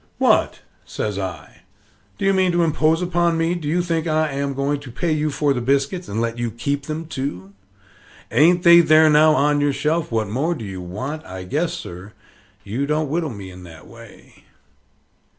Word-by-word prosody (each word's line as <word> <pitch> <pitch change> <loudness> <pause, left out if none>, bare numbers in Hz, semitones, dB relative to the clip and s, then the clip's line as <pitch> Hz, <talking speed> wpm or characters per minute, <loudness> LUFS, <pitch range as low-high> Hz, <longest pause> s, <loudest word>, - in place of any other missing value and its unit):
"What!" - - +2 0.2
says 105 -2 -4
I, 85 -6 -7 0.6
"do - - -3
you 195 - +4
mean 190 -1 +2
to 175 0 +2
impose 160 +1 +1
upon 175 -1 +1
me? 165 +1 +1
do 170 -4 -5
you 175 +4 +1
think 165 -1 -1
I 155 -1 +1
am 140 0 -3
going 140 +1 -1
to 140 -3 -11
pay 165 +7 -2
you 155 0 0
for 145 0 +1
the 125 - -3
biscuits 140 +8 0
and 105 - -3
let 115 0 -2
you 120 -1 -1
keep 140 +5 -3
them, 155 +1 -4
too? 130 - -5 0.8
Ain't 175 +4 +4
they 170 0 +8
there 155 -1 +5
now 155 +1 +5
on 145 +1 +2
your 145 -1 +1
shelf? 155 +3 -1
What 110 -2 0
more 140 - -1
do 115 - -7
you 95 -2 -7
want? 130 - -6
I 95 0 -8
guess, 150 - -1
sir, 90 +4 -9 0.5
you 120 +8 -3
don't 150 0 0
whittle 160 +1 -1
me 100 -6 -9
in 90 0 -12
that 80 -2 -13
way." - - -16
145 Hz, 195 wpm, -21 LUFS, 115-160 Hz, 0.8 s, they